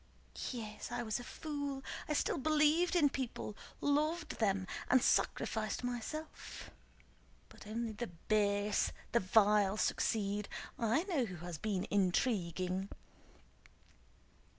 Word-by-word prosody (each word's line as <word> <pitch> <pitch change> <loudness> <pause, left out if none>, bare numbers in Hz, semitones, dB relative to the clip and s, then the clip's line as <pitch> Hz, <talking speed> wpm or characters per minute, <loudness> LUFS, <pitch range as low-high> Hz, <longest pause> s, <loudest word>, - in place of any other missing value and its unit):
"Yes, 220 -2 -6
I 240 0 -2
was 220 0 -1
a - - -7
fool! 285 -2 -4 0.3
I - - +2
still 290 - +1
believed 310 +5 +3
in 315 -4 +6
people, 260 -6 -3 0.3
loved 305 +3 +1
them, 195 -4 +2 0.2
and 255 - +7
sacrificed 220 -2 +1
myself. 245 +6 -5 0.8
But - - -13
only 225 +1 -2
the 230 +3 -4
base, 205 +3 +1 0.2
the 235 - +4
vile 205 0 +4
succeed! 205 -2 0 0.3
I 235 +7 +2
know 335 -10 +1
who 175 -5 -7
has 170 -3 -5
been 200 -2 -1
intriguing!" 185 - +1
220 Hz, 115 wpm, -35 LUFS, 200-280 Hz, 0.8 s, and